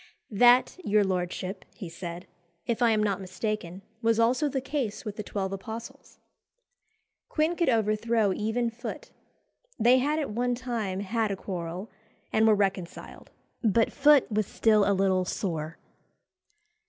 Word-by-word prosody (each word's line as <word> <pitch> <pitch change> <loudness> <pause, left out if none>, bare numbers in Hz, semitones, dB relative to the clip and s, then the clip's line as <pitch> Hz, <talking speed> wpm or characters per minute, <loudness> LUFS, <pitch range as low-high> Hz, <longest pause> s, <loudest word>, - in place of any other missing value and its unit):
"That, 245 - +5
your 210 -4 +3
lordship," 185 0 -3
he 195 - -7
said, 170 +1 -7 0.4
"if 235 +1 -2
I 240 - +5
am 215 -1 +2
not 200 -2 0
mistaken, 190 0 -4 0.2
was 230 -1 +2
also 250 +6 +2
the 270 - -1
case 260 -5 -3
with 210 -1 -5
the 215 - -4
twelve 195 -2 -3
apostles." 220 +4 -8 1.1
Quin 315 +3 +1
could 340 -4 +1
overthrow 220 -2 +2
even 225 +4 -1
Foote. 245 - -7 0.7
They 245 +3 +5
had 295 +4 0
at 295 -7 -2
one 245 +3 0
time 230 -6 -3
had 220 +2 -1
a 200 - -1
quarrel, 180 +1 -6 0.4
and 220 0 +4
were 215 - +6
reconciled, 195 -3 -3 0.3
but 225 +1 +2
Foote 290 -1 +5
was 215 -1 0
still 215 -2 +3
a - - +4
little 190 -1 +2
sore. 165 -4 -3
215 Hz, 145 wpm, -27 LUFS, 195-240 Hz, 1.1 s, were